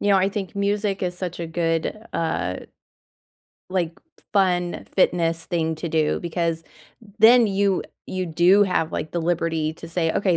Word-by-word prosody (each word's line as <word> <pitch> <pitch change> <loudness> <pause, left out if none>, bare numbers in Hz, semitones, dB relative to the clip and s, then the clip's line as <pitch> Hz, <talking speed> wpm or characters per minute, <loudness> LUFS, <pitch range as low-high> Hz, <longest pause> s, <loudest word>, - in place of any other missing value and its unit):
You 205 - 0
know, 195 - +6
I 190 0 +3
think 200 -1 -5
music 200 0 0
is 180 -1 -2
such 180 -1 -5
a 170 - -3
good, 165 +3 -1 0.2
uh 125 - -1 1.1
like, 180 -3 -1 0.3
f - - -22
fun, 180 -3 +1
fitness 165 -3 +2
thing 160 -3 -1
to 170 +2 -4
do, 155 -1 +1
because 170 -1 -2 0.6
then 230 +2 +7
you 195 -1 +1 0.2
you 185 -1 -3
do 175 +5 +5
have, 165 -4 0
like, 155 - -4
the 170 - -1
liberty 165 -2 0
to 165 - -10
say, 165 -1 0
"Okay, 185 -4 +2
175 Hz, 170 wpm, -23 LUFS, 165-195 Hz, 1.1 s, then